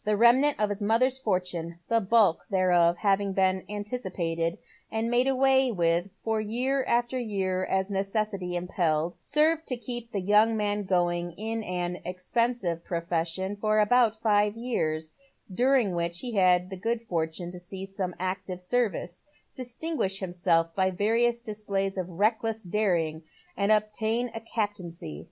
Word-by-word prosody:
The 210 0 +1
remnant 255 +5 +5
of 210 -1 +2
his 205 +1 -4
mother's 245 +5 +2
fortune 180 -6 -2
— - - -45
the 230 0 +2
bulk 200 -4 +3
thereof 175 -3 +3
having 200 0 +1
been 190 -1 +2
anticipated, 185 -6 -3 0.3
and 225 +1 -1
made 245 +2 +3
away 265 -1 +3
with 170 -1 +1
from 220 -1 0
year 255 +5 0 0.3
to 260 - -3
year 190 -5 -1
as 190 +1 -1
necessity 195 -2 -2
impelled 175 -2 0
— - - -43
served 315 +2 +1
to 250 - -1
keep 240 -1 -5
the 200 - -1
young 210 +4 +4
man 205 -1 -1
going 175 -2 0
in 225 +4 -4
an 180 -2 -3
expensive 185 -1 -1
profession 170 +3 -2
for 215 +1 +2
about 225 0 +3
five 210 -1 +2
years, 160 -10 -2 0.4
during 250 -3 +3
which 170 0 -1
he 245 -2 -4
had 180 -2 +3
the 190 - -5
good 230 +4 -2
fortune 170 -3 -3
to 180 - -8
see 190 +2 -7
some 195 -2 -4
active 185 0 -3
service, 185 -3 -2 0.3
distin 260 +6 -5
guish 195 -4 +1
himself 175 -3 +1
by 190 -1 +2
various 230 +5 +1
displays 200 -3 -3
of 185 -2 -3
reckless 220 +4 0
daring, 175 -5 0 0.3
and 200 +1 +1
obtain 220 +3 +1
a 225 - -4
captaincy. 185 - -4
200 Hz, 155 wpm, -27 LUFS, 180-225 Hz, 0.4 s, remnant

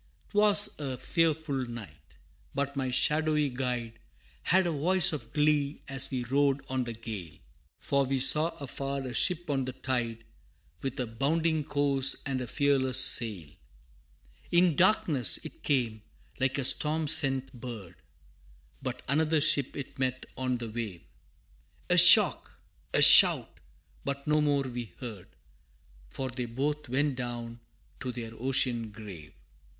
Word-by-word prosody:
'Twas 205 -2 +4
a 135 -3 -5
fearful 160 -5 -1
night, 115 -3 -12 0.4
but 140 0 -3
my 135 -2 -3
shadowy 150 +2 +1
guide 125 -3 -5 0.4
Had 185 +1 +2
a 170 - -1
voice 165 +3 +4
of 130 -7 -7
glee 150 -1 0
as 135 -1 -5
we 130 -2 -4
rode 140 +2 0
on 130 -1 -3
the 120 - -6
gale, 110 -8 -9 0.4
For 140 0 0
we 135 0 -2
saw 150 +5 +4
afar 140 0 -5
a 125 - -6
ship 175 +5 0
on 135 -3 -2
the 130 - -6
tide, 120 -3 -4 0.6
With 135 -1 -5
a 125 - -1
bounding 155 +7 -1
course 140 -2 0
and 135 -2 -3
a 125 - -6
fearless 130 0 0
sail. 105 - +2 1.0
In 175 -2 +3
darkness 150 - +3
it - - -11
came, 120 -6 -1 0.4
like 130 +1 -1
a 135 - -1
storm 155 +3 +5
sent 135 -4 +3
bird, 115 -8 -9 0.9
But - - -6
another 155 +3 +1
ship 145 -3 +1
it 140 -1 -8
met 130 -1 -3
on 130 -1 -2
the 120 -1 -7
wave: 105 -7 -6 0.9
A - - +3
shock - - +6 0.3
a - - +3
shout - - +7 0.4
but 140 0 -5
no 150 0 +1
more 145 -2 0
we 120 -3 -7
heard, 110 -8 -9 0.8
For 130 - -5
they 125 0 -5
both 145 +4 -4
went 135 +1 -1
down 120 -2 -6 0.4
to 130 - -5
their 115 -2 -8
ocean 120 -1 -1
grave! 100 -8 -12
135 Hz, 145 wpm, -28 LUFS, 120-150 Hz, 1.0 s, shout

